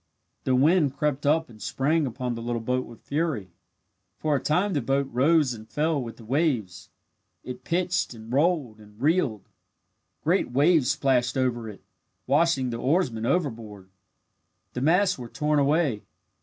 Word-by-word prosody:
The 130 - +2
wind 145 +1 +3
crept 145 -1 -1
up 160 +2 +2
and 110 -3 -16
sprang 150 +2 0
upon 125 0 -3
the 115 - -6
little 120 0 -2
boat 125 +3 -2
with 115 - -14
fury. 145 - -2 0.7
For 155 -2 0
a - - +1
time 185 +6 +1
the 145 - 0
boat 135 +3 0
rose 140 +1 +3
and 110 -1 -11
fell 155 -1 0
with 115 -2 -7
the 115 - -13
waves. 115 - -1 0.5
It 125 0 -8
pitched 175 -5 -1
and 115 +1 -9
rolled 145 -7 +1
and 105 0 -17
reeled. 140 - +1 0.8
Great 175 0 +1
waves 145 +1 +3
splashed 125 -1 +1
over 120 -3 -1
it, 100 - -12 0.4
washing 140 -2 +2
the 115 - -3
oarsmen 130 -7 0
overboard. 110 - -3 0.8
The 125 - -4
masts 180 +4 +3
were 120 -1 -7
torn 150 +2 0
away. 145 -6 +1
135 Hz, 155 wpm, -26 LUFS, 115-155 Hz, 0.8 s, wind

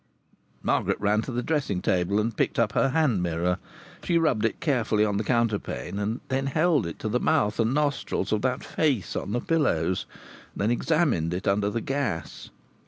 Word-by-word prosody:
Margaret - - +1
ran 105 +1 +2
to 130 - -6
the 120 0 -2
dressing 140 - 0
table 90 +2 +1
and 110 +1 -1
picked - - 0
up 115 -3 +2
her 135 - +2
hand 135 - +2
mirror. 90 +1 0 0.4
She 170 - +2
rubbed 145 -10 +2
it 115 - -1
carefully 115 -9 +1
on 105 -1 0
the 105 - 0
counterpane, 115 -4 -1
and 110 +4 -2
then 135 +1 -1
held 155 - +2
it 85 - -6
to - - -2
the 120 +3 +1
mouth 105 -2 +1
and 115 +1 +2
nostrils 145 -3 -1
of 110 -1 +1
that 130 +1 -1
face 135 - 0
on 100 - -3
the 120 - 0
pillows, 145 - 0 0.5
and - - -4
then 110 - +2
examined 120 - +1
it 90 - -4
under 100 +1 +2
the 115 +2 -2
gas. 120 - -3
115 Hz, 190 wpm, -26 LUFS, 100-135 Hz, 0.5 s, ran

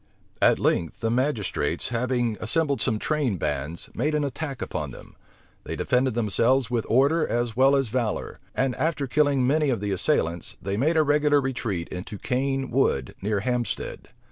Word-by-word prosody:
At - - +5
length, 85 - 0
the 115 -1 0
magistrates, 115 - -1
having 120 -1 0
assembled 140 +1 0
some 110 -1 +1
train 140 -5 0
bands, 75 +1 -3
made 150 +5 0
an 150 - +1
attack 140 0 -4
upon - - -3
them. - - -12 0.5
They - - -5
defended 125 -1 +1
themselves 120 +3 +2
with 120 -2 -1
order 140 +7 +3
as 120 -2 -1
well 135 +3 +5
as 135 -4 +1
valor; 115 -2 -2 0.2
and 130 -1 +1
after 150 0 0
killing 140 -1 +2
many 150 +2 +2
of 120 -5 0
the 100 0 -2
assailants 85 - -1
they 100 +2 -3
made 155 +9 +2
a 155 - +5
regular 145 0 +3
retreat 115 -10 -2
into 90 +3 -6
Cane 135 +3 -1
Wood, 90 - +1
near 105 0 0
Hampstead. 125 +1 -3
125 Hz, 170 wpm, -25 LUFS, 105-140 Hz, 0.5 s, At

